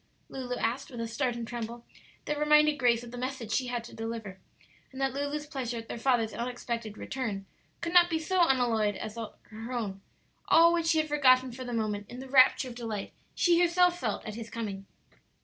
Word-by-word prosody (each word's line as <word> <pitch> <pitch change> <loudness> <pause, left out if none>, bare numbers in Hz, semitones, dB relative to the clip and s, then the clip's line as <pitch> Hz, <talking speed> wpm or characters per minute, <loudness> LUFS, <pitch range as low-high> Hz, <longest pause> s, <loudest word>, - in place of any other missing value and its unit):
Lulu 250 -2 -4
asked, 245 +3 -2
with 245 - -8
a 230 - -2
start 240 +2 -1
and 235 -1 -5
tremble 235 0 -6 0.4
that 295 0 -2
reminded 300 0 +4
Grace 240 -2 +3
of 240 - -10
the 245 - -7
message 255 -3 -4
she 250 +3 +1
had 240 -1 -3
to 235 - -11
deliver, 225 -4 -6 0.5
and 265 - -9
that 270 -1 0
Lulu's 285 +2 -3
pleasure 260 -5 -4
at 225 0 -7
their - - -5
father's 235 -3 +1
unexpected 235 -2 -4
return 215 -7 -4 0.4
could 335 +1 -3
not 350 -1 +7
be 325 - +1
so 355 +4 +1
unalloyed 230 -6 +2
as 215 +2 -6
her 225 0 -8
own; 205 -6 -3 0.5
all 335 +1 +6
which 335 -1 0
she 330 -1 +3
had 310 0 +2
forgotten 260 -4 +4
for 255 +2 -7
the 245 - -6
moment 210 -3 -2
in 245 - -8
the 265 +1 -8
rapture 260 0 +5
of - - -8
delight 225 -4 -5 0.2
she 345 -1 +4
herself 355 0 +3
felt 220 -8 -2
at 215 - -5
his 230 +1 -7
coming. 200 -4 -5
245 Hz, 205 wpm, -29 LUFS, 225-280 Hz, 0.5 s, not